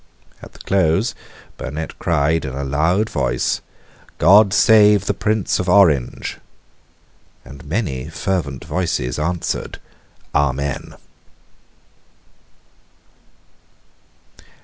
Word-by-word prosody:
At - - -13
the - - -16
close 95 +4 +1 0.4
Burnet 80 +1 -6
cried 80 0 +1
in 65 -2 -5
a 70 - -4
loud 80 +10 +1
voice, - - -1 0.6
"God 100 +5 +6
save 105 -1 +5
the - - 0
Prince 105 +1 -1
of 90 - -2
Orange!" 85 -10 +2 1.1
and 70 +1 -12
many 75 - -3
fervent 80 -6 -3
voices 80 -8 -2
answered, 85 +3 -3 0.5
"Amen." 70 -1 -1
80 Hz, 85 wpm, -19 LUFS, 70-100 Hz, 1.1 s, God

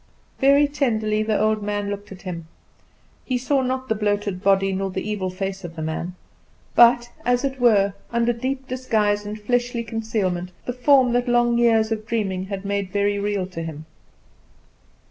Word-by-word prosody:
Very 280 +2 +5
tenderly 220 -7 0
the 215 -1 0
old 215 0 +2
man 205 0 -2
looked 205 0 -7
at 190 - -11
him. 170 -3 -6 0.8
He 255 - -1
saw 265 +2 +1
not 260 0 -2
the 220 - +1
bloated 205 -3 -1
body 195 0 +3
nor 195 +1 -1
the 190 +2 -4
evil 200 -3 -2
face 195 +1 -4
of 170 -1 -8
the 160 - -5
man; 170 +3 -4 0.6
but, 240 0 +5
as 245 +1 +1
it 270 -1 -2
were, 200 -5 +4 0.2
under 235 0 +2
deep 260 +3 -4
disguise 215 -5 0
and 210 +1 -5
fleshly 240 +2 0
concealment, 210 -6 -2
the 245 - -2
form 255 -1 +4
that 245 +1 +1
long 240 0 +3
years 225 -2 +3
of 215 -1 -3
dreaming 195 -5 -1
had 195 0 -6
made 200 -1 -1
very 205 0 +1
real 200 -2 -1
to 180 -3 -7
him. 160 -1 -7
215 Hz, 175 wpm, -23 LUFS, 195-240 Hz, 0.8 s, Very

